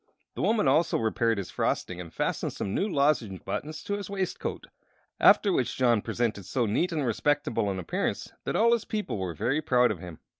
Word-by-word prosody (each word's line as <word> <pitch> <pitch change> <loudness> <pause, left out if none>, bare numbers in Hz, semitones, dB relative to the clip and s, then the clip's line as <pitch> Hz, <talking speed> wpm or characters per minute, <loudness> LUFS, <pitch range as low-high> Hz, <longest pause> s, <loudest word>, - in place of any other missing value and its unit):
The - - -5
woman 220 -8 +2
also 155 +5 +3
repaired 115 0 +1
his 100 - -5
frosting 90 0 -1
and 85 -2 -9
fastened - - -2
some 95 - -4
new 205 - 0
lozenge 140 - +1
buttons 155 +1 -4
to 205 - -3
his 205 -1 -4
waistcoat, 195 -2 -3 0.5
after - - +6
which - - 0
John 120 -4 +3
presented 110 -5 -2
so 125 -3 0
neat 170 - 0
and 155 -4 -1
respectable 120 -2 0
an 95 - -2
appearance 90 - -2
that - - -2
all 230 +2 +4
his 235 - +1
people 210 - -3
were 90 -3 -3
very 135 - 0
proud 125 -5 +3
of 100 - -5
him. 85 -2 -9
125 Hz, 195 wpm, -28 LUFS, 100-160 Hz, 0.5 s, after